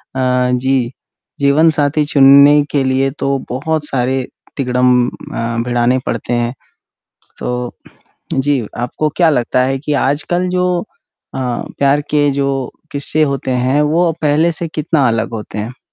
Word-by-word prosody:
अ, 125 -1 +1
जी। 125 -1 0 0.5
जीवनसाथी 150 +1 +3
चुनने 140 +1 +6
के 140 -2 +1
लिए 135 +1 +1
तो 135 0 0
बहुत 150 +4 -2
सारे 130 -1 -1 0.3
तिगड़म 125 -2 +2
अ 115 0 -5
भिड़ाने 120 +1 +1
पड़ते 120 - -3
हैं। 120 +1 0 0.7
स - - -25
तो 125 0 -3 0.6
जी, 135 -3 0
आपको 125 +5 -1
क्या 170 -3 +4
लगता 125 -1 +1
है 135 +1 -1
कि 150 +2 -4
आजकल 175 +6 0
जो 180 0 0
अ, 215 - -14 0.4
प्यार 140 +1 +3
के 145 -1 +2
जो 135 -2 -1 0.2
किस्से 145 +2 +2
होते 140 -2 -1
हैं, 130 +3 +1
वो 165 +3 +2
पहले 155 +3 +3
से 170 - -4
कितना 155 -3 0
अलग 115 0 -1
होते 105 -1 -6
हैं। 115 +5 -6
135 Hz, 145 wpm, -15 LUFS, 125-150 Hz, 0.7 s, चुनने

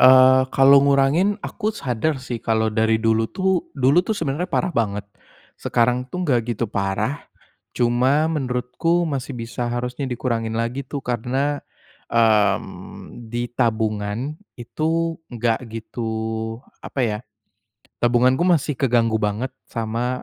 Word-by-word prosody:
eee, 130 0 +8
kalau 135 +1 +6
ngurangin, 140 +9 +3
aku 215 -2 -3
sadar 135 - -1
sih 125 -3 -5
kalau 110 -1 +1
dari 110 +1 +2
dulu 110 0 +1
tuh 190 -2 0
dulu 135 +5 +4
tuh 210 +3 -2
sebenarnya 160 +2 -2
parah 180 - 0
banget, 105 -5 -1 0.6
sekarang 125 +2 +1
tuh 180 +5 -3
enggak 125 -6 +3 0.2
gitu 120 - 0
parah. 100 +7 -2 0.5
Cuma 130 +6 +2
menurutku 135 +4 0
masih 135 -2 -3
bisa 120 +1 -4
harusnya 125 +3 -3
dikurangin 115 -3 -2
lagi 120 +4 -2
tuh 140 0 -5
karena, 130 +5 -1 0.5
mmm, 110 +1 0
di 120 +1 -3
tabungan 110 +3 -1 0.2
itu 160 +7 -2
enggak 115 -1 0
gitu, 115 +1 -5 0.7
apa 135 - -5
ya, 105 -3 0 0.8
tabunganku 125 +6 +3
masih 150 -6 +2
keganggu 115 -4 +2
banget 105 +5 -1 0.2
sama 120 +2 -3
125 Hz, 125 wpm, -22 LUFS, 115-140 Hz, 0.8 s, eee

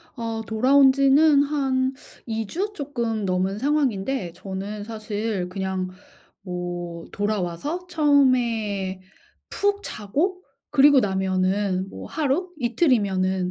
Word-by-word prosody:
아 230 -2 -3
돌아온 265 +5 +5
지는 280 +2 +5
한 270 -3 0 0.3
2 225 -1 -2
주 395 - -3
쪼끔 235 - -3
넘은 185 +1 0
상황인데 265 - 0
저는 195 +3 -6
사실 215 -3 -3
그냥 190 -1 -3 0.5
뭐 175 -2 -5
돌아와서 205 - -2
처음에 240 - +2 0.5
푹 405 0 0
자고 325 - -2 0.3
그리고 285 -1 +6
나면은 190 -1 0
뭐 - - -8
하루, 320 +5 -1
이틀이면은 200 - +1
225 Hz, 210 characters per minute, -24 LUFS, 190-280 Hz, 0.5 s, 그리고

